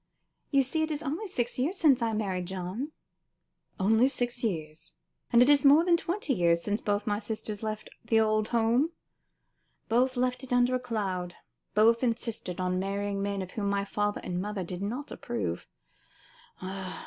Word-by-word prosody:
You 275 -2 +4
see 315 +5 -1
it 315 - 0
is 300 0 -3
only 320 +9 -3
six 245 -9 -2
years 320 +10 0
since 280 -8 +4
I 230 -1 +1
married 190 -4 -2
John." 190 - -4 0.9
"Only 220 +6 +4
six 245 -2 -3
years. 155 -7 -4 0.4
And 240 +1 +7
it - - +2
is 285 -2 +5
more 295 +4 +7
than 350 -1 +5
twenty 335 -3 -1
years 170 -4 +2
since 210 +3 -1
both 205 0 0
my 205 -1 0
sisters 215 -1 -5
left 215 -1 -4 0.2
the 225 -1 +3
old 215 -1 +2
home. 240 +7 +2 1.0
Both 250 +3 +2
left 250 +1 0
it 265 - -9
under 245 0 +3
a 255 - +2
cloud; 195 -7 -3 0.4
both 230 +2 +5
insisted 230 -6 -2
on 185 0 0
marrying 200 +1 -2
men 200 -1 -1
of 180 - -9
whom 200 -2 -2
my 200 0 0
father 205 0 -1
and 180 0 -2
mother 205 -1 -3
did 180 +1 -6
not 245 +8 -4
approve. 90 -8 -4
220 Hz, 170 wpm, -29 LUFS, 195-255 Hz, 1.0 s, And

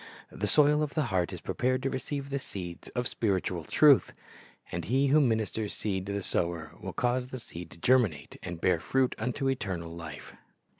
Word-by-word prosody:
The 105 - -2
soil 150 +6 +5
of 150 -1 -2
the 155 - +2
heart 90 -2 +1
is - - -7
prepared 130 +1 0
to 135 - +1
receive 140 +2 -4
the 140 - 0
seeds 90 -8 -7
of 125 0 0
spiritual 95 -5 -1
truth. 145 - +5 0.6
And 85 -1 -3
He 135 +6 +2
who 150 +3 +6
ministers 110 -4 0
seed 95 -3 -2
to - - -2
the 100 -1 -2
sower 85 -4 -1
will 95 - -4
cause 125 +4 0
the 130 - -6
seed 90 -8 -8
to - - -14
cferminate 105 - +2
and 85 -2 -6
bear 85 -1 +3
fruit 130 +8 +1
unto 135 +2 -1
eternal 95 -10 -2
life. 85 -1 -8
110 Hz, 190 wpm, -29 LUFS, 90-130 Hz, 0.6 s, who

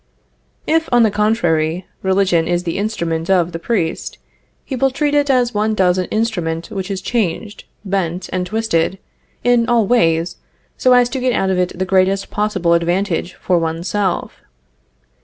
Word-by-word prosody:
If, 325 +1 +1
on 240 -1 +5
the 220 - +3
contrary, 175 -6 +1 0.2
religion 190 -3 +2
is 175 0 0
the 170 +2 -3
instrument 170 -6 -2
of 180 -3 +2
the 165 - -5
priest, 170 -4 -2 0.5
he 265 - -4
will 270 +2 +2
treat 290 +2 -1
it 290 -1 +2
as 250 -2 +2
one 215 +1 0
does 185 -2 +2
an 185 - 0
instrument 175 -7 -2
which 195 -2 -4
is 190 -1 -4
changed, 210 -2 -2 0.2
bent 185 -2 -2
and 180 -1 -1
twisted 195 -4 0 0.5
in 245 -1 +3
all 235 -3 +3
ways 170 -6 +2 0.4
so 255 - +3
as 245 -1 +5
to 265 - -3
get 250 -1 +1
out 190 -3 +1
of 185 - 0
it 180 -1 -1
the 185 - -1
greatest 190 +1 +1
possible 195 -5 +1
advantage 175 +1 0
for 180 -2 0
one's 165 +1 -3
self. 195 -2 -1
190 Hz, 170 wpm, -18 LUFS, 175-225 Hz, 0.5 s, on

